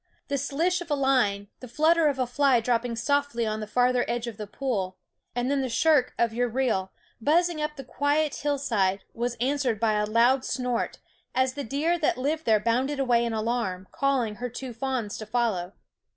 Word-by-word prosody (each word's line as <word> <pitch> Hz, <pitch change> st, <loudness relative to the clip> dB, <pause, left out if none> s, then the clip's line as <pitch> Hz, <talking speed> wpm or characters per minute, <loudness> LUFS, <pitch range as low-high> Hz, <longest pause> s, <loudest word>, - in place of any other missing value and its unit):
The 280 Hz, -1 st, 0 dB
slish 330 Hz, +7 st, 0 dB
of 350 Hz, -, -8 dB
a 295 Hz, -, +2 dB
line, 245 Hz, -8 st, +1 dB
the 255 Hz, -, -9 dB
flutter 315 Hz, +5 st, +3 dB
of 280 Hz, -2 st, 0 dB
a 255 Hz, -, +1 dB
fly 260 Hz, 0 st, +3 dB
dropping 235 Hz, 0 st, 0 dB
softly 285 Hz, -1 st, 0 dB
on 215 Hz, 0 st, -2 dB
the 215 Hz, -, -5 dB
farther 245 Hz, +2 st, +2 dB
edge 235 Hz, 0 st, -2 dB
of 235 Hz, -4 st, -6 dB
the 210 Hz, -, -6 dB
pool 205 Hz, -6 st, -3 dB, 0.4 s
and 245 Hz, +2 st, 0 dB
then 280 Hz, -1 st, +1 dB
the 260 Hz, -, -2 dB
shriek 260 Hz, +1 st, +3 dB
of 230 Hz, -1 st, +1 dB
your 245 Hz, +1 st, 0 dB
reel, 225 Hz, -6 st, 0 dB, 0.3 s
buzzing 330 Hz, +4 st, +2 dB
up 300 Hz, 0 st, -2 dB
the 270 Hz, -, -7 dB
quiet 290 Hz, +3 st, 0 dB
hillside, 230 Hz, -10 st, 0 dB
was 240 Hz, +1 st, -2 dB
answered 255 Hz, -3 st, 0 dB
by 220 Hz, -1 st, +2 dB
a 210 Hz, 0 st, +1 dB
loud 240 Hz, +4 st, +3 dB
snort, 250 Hz, -3 st, -2 dB, 0.4 s
as 260 Hz, 0 st, +2 dB
the 285 Hz, +1 st, -4 dB
deer 305 Hz, +8 st, 0 dB
that 300 Hz, -6 st, +1 dB
lived 305 Hz, +5 st, -1 dB
there 220 Hz, -2 st, +4 dB
bounded 255 Hz, +6 st, 0 dB
away 245 Hz, -3 st, +3 dB
in 235 Hz, -, -1 dB
alarm, 215 Hz, -5 st, -2 dB
calling 255 Hz, -7 st, 0 dB
her 250 Hz, 0 st, -4 dB
two 245 Hz, +1 st, -7 dB
fawns 240 Hz, -3 st, -3 dB
to 215 Hz, -, -7 dB
follow. 215 Hz, -6 st, -1 dB
250 Hz, 195 wpm, -26 LUFS, 225-280 Hz, 0.4 s, there